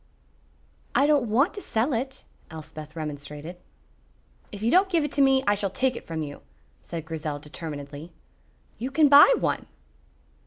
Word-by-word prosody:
"I 275 Hz, -, +5 dB
don't 290 Hz, -6 st, +2 dB
want 275 Hz, -, +2 dB
to 405 Hz, -, -7 dB
sell 240 Hz, -, -1 dB
it," 260 Hz, +3 st, -3 dB, 0.3 s
Elspeth 155 Hz, -1 st, -10 dB
remonstrated. 150 Hz, +2 st, -7 dB, 0.9 s
"If 205 Hz, -, -8 dB
you 230 Hz, -, +2 dB
don't 380 Hz, +2 st, +4 dB
give 335 Hz, -4 st, +2 dB
it 295 Hz, -, -3 dB
to 285 Hz, -, +1 dB
me, 270 Hz, -1 st, +4 dB
I 205 Hz, -, +4 dB
shall 200 Hz, -1 st, -1 dB
take 255 Hz, +6 st, 0 dB
it -, -, -9 dB
from 160 Hz, -1 st, -3 dB
you," 145 Hz, -1 st, -8 dB, 0.4 s
said 165 Hz, -2 st, -7 dB
Grizel, 155 Hz, -2 st, -4 dB
determinedly. 150 Hz, +1 st, -8 dB, 0.7 s
"You 250 Hz, +4 st, -3 dB
can 295 Hz, +1 st, +4 dB
buy 285 Hz, -, +9 dB
one." -, -, -1 dB
205 Hz, 160 wpm, -26 LUFS, -, 0.9 s, buy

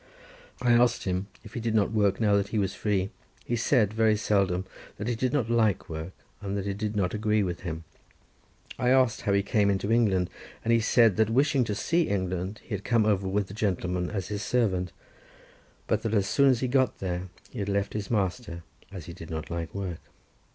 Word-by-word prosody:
I 120 Hz, -, +4 dB
asked 120 Hz, +1 st, +4 dB
him 95 Hz, +1 st, -2 dB, 0.2 s
if 105 Hz, -, -12 dB
he -, -, -3 dB
did 115 Hz, -1 st, -1 dB
not 105 Hz, -1 st, +2 dB
work 100 Hz, -3 st, +2 dB
now 105 Hz, -3 st, +3 dB
that 100 Hz, 0 st, +1 dB
he 110 Hz, -, -3 dB
was 95 Hz, -2 st, 0 dB
free? 100 Hz, -2 st, -1 dB, 0.3 s
He 120 Hz, -, -1 dB
said 115 Hz, -3 st, +2 dB
very 110 Hz, -1 st, +3 dB
seldom; 95 Hz, -3 st, +1 dB, 0.3 s
that 105 Hz, -, -4 dB
he 120 Hz, -, +1 dB
did 125 Hz, +2 st, -1 dB
not 135 Hz, -6 st, +1 dB
like 115 Hz, -4 st, +1 dB
work, 80 Hz, +3 st, -5 dB, 0.3 s
and 100 Hz, 0 st, -3 dB
that 100 Hz, -, -3 dB
it 100 Hz, 0 st, -3 dB
did 105 Hz, 0 st, -2 dB
not 95 Hz, -3 st, 0 dB
agree 105 Hz, 0 st, +1 dB
with 90 Hz, -2 st, -3 dB
him. 80 Hz, -2 st, -5 dB, 1.0 s
I 125 Hz, -, +2 dB
asked 130 Hz, -3 st, +3 dB
how 100 Hz, -, 0 dB
he 100 Hz, 0 st, +3 dB
came 100 Hz, 0 st, +2 dB
into 100 Hz, +2 st, 0 dB
England, 95 Hz, -6 st, +2 dB, 0.3 s
and 115 Hz, -, +2 dB
he 115 Hz, -, +5 dB
said 115 Hz, -2 st, +4 dB
that 110 Hz, -1 st, +3 dB
wishing 135 Hz, +3 st, +3 dB
to 105 Hz, -, -2 dB
see 170 Hz, +7 st, +1 dB
England, 95 Hz, +1 st, -2 dB
he 115 Hz, -, -8 dB
had 100 Hz, -1 st, -3 dB
come 115 Hz, -3 st, +2 dB
over 100 Hz, -3 st, +1 dB
with 95 Hz, 0 st, -1 dB
a -, -, -8 dB
gentleman 90 Hz, -4 st, -1 dB
as 95 Hz, -3 st, -4 dB
his 105 Hz, -1 st, -3 dB
servant, 95 Hz, -8 st, 0 dB, 0.9 s
but -, -, 0 dB
that 115 Hz, 0 st, -1 dB
as 100 Hz, -2 st, +3 dB
soon 140 Hz, +6 st, +4 dB
as 125 Hz, -3 st, +2 dB
he 130 Hz, -, +1 dB
got 130 Hz, 0 st, +2 dB
there, 90 Hz, 0 st, -3 dB, 0.2 s
he -, -, -7 dB
had 100 Hz, 0 st, -2 dB
left 100 Hz, 0 st, 0 dB
his 105 Hz, -1 st, -4 dB
master, 95 Hz, -4 st, -2 dB, 0.3 s
as 90 Hz, -6 st, -8 dB
he 85 Hz, -, -8 dB
did 80 Hz, -, -10 dB
not 80 Hz, -1 st, -5 dB
like 85 Hz, -1 st, -3 dB
work. 95 Hz, -4 st, -4 dB
100 Hz, 220 wpm, -27 LUFS, 95-115 Hz, 1.0 s, he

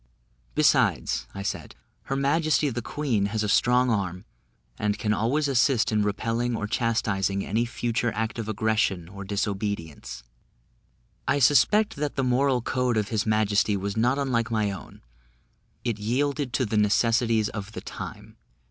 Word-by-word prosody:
"Besides," -, -, +2 dB
I 100 Hz, -, -5 dB
said, -, -, -4 dB, 0.3 s
"her 135 Hz, -, -2 dB
majesty 150 Hz, +2 st, +2 dB
the 120 Hz, +1 st, -3 dB
queen 115 Hz, -6 st, -1 dB
has 110 Hz, +1 st, -2 dB
a -, -, 0 dB
strong 125 Hz, +3 st, +3 dB
arm, 90 Hz, -4 st, -2 dB, 0.5 s
and 105 Hz, -1 st, 0 dB
can 105 Hz, -1 st, 0 dB
always 135 Hz, +8 st, +1 dB
assist 125 Hz, -2 st, +2 dB
in 105 Hz, -1 st, +2 dB
repelling 115 Hz, +4 st, -1 dB
or 105 Hz, -, -3 dB
chastising 105 Hz, -4 st, 0 dB
any 115 Hz, +4 st, 0 dB
future 115 Hz, 0 st, -1 dB
act 110 Hz, +2 st, -2 dB
of 110 Hz, -1 st, -4 dB
aggression 110 Hz, -5 st, 0 dB
or 100 Hz, +2 st, -9 dB
disobedience." 100 Hz, -, -3 dB, 1.0 s
I -, -, +3 dB
suspect 150 Hz, -, +4 dB
that 145 Hz, 0 st, -2 dB
the 135 Hz, -, 0 dB
moral 125 Hz, 0 st, +2 dB
code 125 Hz, -2 st, 0 dB
of 105 Hz, -2 st, 0 dB
his 110 Hz, -1 st, -1 dB
majesty 105 Hz, -1 st, +2 dB
was 100 Hz, +1 st, -3 dB
not 120 Hz, +4 st, +2 dB
unlike 120 Hz, -5 st, 0 dB
my 110 Hz, -3 st, 0 dB
own 95 Hz, -, -10 dB, 0.8 s
it 115 Hz, -4 st, -2 dB
yielded 135 Hz, +5 st, -1 dB
to 130 Hz, -, +1 dB
the 110 Hz, 0 st, -1 dB
necessities 115 Hz, +1 st, +2 dB
of 105 Hz, 0 st, -7 dB
the -, -, -6 dB
time. -, -, -8 dB
110 Hz, 155 wpm, -26 LUFS, 105-125 Hz, 1.0 s, suspect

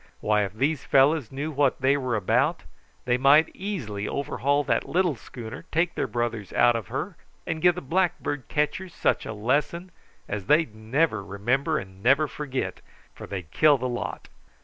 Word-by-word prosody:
Why, 105 Hz, 0 st, +2 dB
if 95 Hz, -, -7 dB
these 140 Hz, +5 st, 0 dB
fellows 140 Hz, -2 st, +3 dB
knew 145 Hz, +4 st, -4 dB
what 140 Hz, -2 st, +1 dB
they 135 Hz, +1 st, +3 dB
were 130 Hz, -4 st, -1 dB
about, 105 Hz, -4 st, +1 dB, 0.4 s
they 125 Hz, 0 st, +1 dB
might 145 Hz, +4 st, +5 dB
easily 120 Hz, -, -4 dB
overhaul 140 Hz, +1 st, 0 dB
that -, -, 0 dB
little 175 Hz, -4 st, +2 dB
schooner, 115 Hz, -1 st, -9 dB
take 165 Hz, +2 st, +1 dB
their -, -, -2 dB
brothers 120 Hz, -4 st, -3 dB
out 120 Hz, -1 st, +4 dB
of 115 Hz, -5 st, -4 dB
her, -, -, -4 dB, 0.3 s
and 160 Hz, -, -3 dB
give 180 Hz, 0 st, +5 dB
the 180 Hz, -, -5 dB
blackbird 145 Hz, -4 st, -1 dB
catchers 165 Hz, +5 st, -2 dB
such -, -, 0 dB
a -, -, -4 dB
lesson 145 Hz, -, -1 dB, 0.4 s
as 100 Hz, -2 st, -5 dB
they'd 150 Hz, -6 st, +3 dB
never 110 Hz, +1 st, 0 dB
remember 120 Hz, +11 st, 0 dB
and 95 Hz, 0 st, -8 dB
never 140 Hz, +7 st, +4 dB
forget, 135 Hz, -3 st, -4 dB, 0.3 s
for -, -, -10 dB
they'd 90 Hz, -6 st, -6 dB
kill 150 Hz, -2 st, +5 dB
the 130 Hz, 0 st, -2 dB
lot. 120 Hz, -1 st, -5 dB
135 Hz, 170 wpm, -26 LUFS, 110-155 Hz, 0.4 s, might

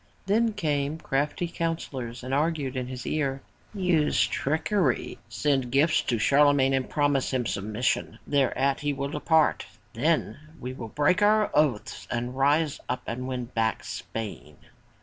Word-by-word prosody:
Then 220 Hz, +3 st, +2 dB
came 150 Hz, -5 st, -1 dB
crafty 150 Hz, +3 st, -1 dB
counsellors 135 Hz, -8 st, -4 dB
and 130 Hz, +1 st, -4 dB
argued 145 Hz, -2 st, 0 dB
in 130 Hz, -1 st, -2 dB
his 125 Hz, -1 st, -7 dB
ear, 135 Hz, -3 st, -1 dB, 0.3 s
"Use 180 Hz, -7 st, +2 dB
trickery. 160 Hz, +7 st, 0 dB
Send 135 Hz, -4 st, 0 dB
gifts 150 Hz, +4 st, +3 dB
to 120 Hz, -, -1 dB
Charlemagne 140 Hz, +2 st, +4 dB
and 135 Hz, -1 st, 0 dB
promise 145 Hz, -2 st, +1 dB
him 130 Hz, -2 st, 0 dB
submission. 105 Hz, +4 st, -1 dB
Thereat 135 Hz, -1 st, +1 dB
he 145 Hz, -1 st, -1 dB
will 140 Hz, 0 st, -3 dB
depart. 155 Hz, +1 st, +2 dB, 0.3 s
Then 150 Hz, +4 st, 0 dB, 0.2 s
we 125 Hz, +1 st, -5 dB
will 115 Hz, -3 st, -7 dB
break 150 Hz, -, +2 dB
our 215 Hz, +1 st, +4 dB
oath, 145 Hz, -8 st, 0 dB
rise 135 Hz, +5 st, +1 dB
up 125 Hz, -, -2 dB
and 125 Hz, +2 st, -4 dB
win 125 Hz, -2 st, -3 dB
back 110 Hz, -3 st, -1 dB
Spain!'' 110 Hz, -2 st, -6 dB
140 Hz, 140 wpm, -27 LUFS, 130-155 Hz, 0.3 s, Charlemagne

